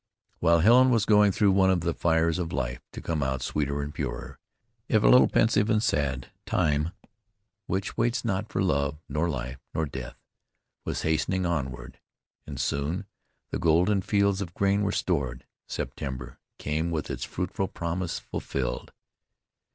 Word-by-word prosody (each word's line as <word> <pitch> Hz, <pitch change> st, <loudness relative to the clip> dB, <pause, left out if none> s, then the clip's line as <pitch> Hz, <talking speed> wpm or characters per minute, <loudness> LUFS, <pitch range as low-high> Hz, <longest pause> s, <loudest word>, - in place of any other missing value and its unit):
While 85 Hz, 0 st, +4 dB
Helen 125 Hz, +7 st, +6 dB
was 115 Hz, -4 st, +3 dB
going 105 Hz, -1 st, +5 dB
through 100 Hz, +1 st, +3 dB
one 95 Hz, 0 st, +4 dB
of 90 Hz, -2 st, +2 dB
the 85 Hz, 0 st, 0 dB
fires 80 Hz, +1 st, +2 dB
of 85 Hz, -2 st, -3 dB
life 60 Hz, -3 st, -2 dB
to -, -, -7 dB
come 80 Hz, -3 st, -1 dB
out 65 Hz, -1 st, -1 dB
sweeter 70 Hz, 0 st, -1 dB
and 75 Hz, +1 st, -6 dB
purer, 65 Hz, -2 st, -5 dB, 0.5 s
if 110 Hz, -2 st, +3 dB
a -, -, +5 dB
little 125 Hz, -, +7 dB
pensive 110 Hz, -1 st, +3 dB
and 110 Hz, -1 st, +2 dB
sad, 65 Hz, -, 0 dB, 0.2 s
time, 75 Hz, -2 st, +1 dB, 0.8 s
which 95 Hz, +1 st, -2 dB
waits 120 Hz, +2 st, +1 dB
not 105 Hz, 0 st, -1 dB
for -, -, 0 dB
love, 70 Hz, -4 st, +1 dB
nor 75 Hz, +4 st, 0 dB
life, 65 Hz, -2 st, -4 dB, 0.2 s
nor 80 Hz, -, +1 dB
death, 65 Hz, -4 st, -7 dB, 0.7 s
was -, -, -3 dB
hastening 90 Hz, +4 st, +1 dB
onward, 65 Hz, -7 st, -3 dB, 0.5 s
and -, -, -6 dB
soon 75 Hz, +8 st, -1 dB, 0.5 s
the -, -, -2 dB
golden 90 Hz, +5 st, +3 dB
fields 100 Hz, 0 st, +1 dB
of 85 Hz, -3 st, -6 dB
grain 100 Hz, +1 st, +2 dB
were 100 Hz, -1 st, +1 dB
stored. 65 Hz, -7 st, -1 dB, 0.2 s
September 65 Hz, -3 st, -5 dB, 0.2 s
came 80 Hz, +3 st, -1 dB
with 80 Hz, -3 st, -3 dB
its -, -, -4 dB
fruitful 95 Hz, +1 st, -2 dB
promise 85 Hz, 0 st, -3 dB
fulfilled. 65 Hz, -3 st, -4 dB
85 Hz, 160 wpm, -27 LUFS, 70-95 Hz, 0.8 s, little